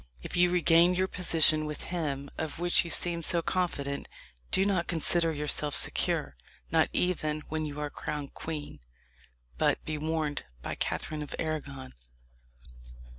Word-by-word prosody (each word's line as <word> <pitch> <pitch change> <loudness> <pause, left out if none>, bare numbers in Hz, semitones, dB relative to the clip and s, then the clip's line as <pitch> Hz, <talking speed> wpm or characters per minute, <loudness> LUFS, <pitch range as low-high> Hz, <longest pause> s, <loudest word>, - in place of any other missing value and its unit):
If - - -5
you 175 0 +5
regain 175 0 +4
your 185 +1 +1
position 160 -4 +3
with 150 -1 -5
him, 145 -5 -3
of 160 -2 -4
which 175 +1 +3
you 170 - -7
seem 170 0 +2
so 170 +1 0
confident, 145 -7 -2 0.4
do 190 - +2
not 190 -4 +1
consider 165 0 +2
yourself 150 -1 +1
secure 65 - +2 0.4
not - - +3
even 155 -4 0
when 155 0 -2
you 150 0 -6
are 150 -1 -3
crowned 145 -1 -5
queen 155 -2 -6 0.8
but - - +1
be 155 -1 -3
warned 155 -1 -2 0.2
by - - -3
Catherine 155 -1 -3
of 150 - -6
Arragon." 140 -5 -4
155 Hz, 145 wpm, -29 LUFS, 150-175 Hz, 0.8 s, you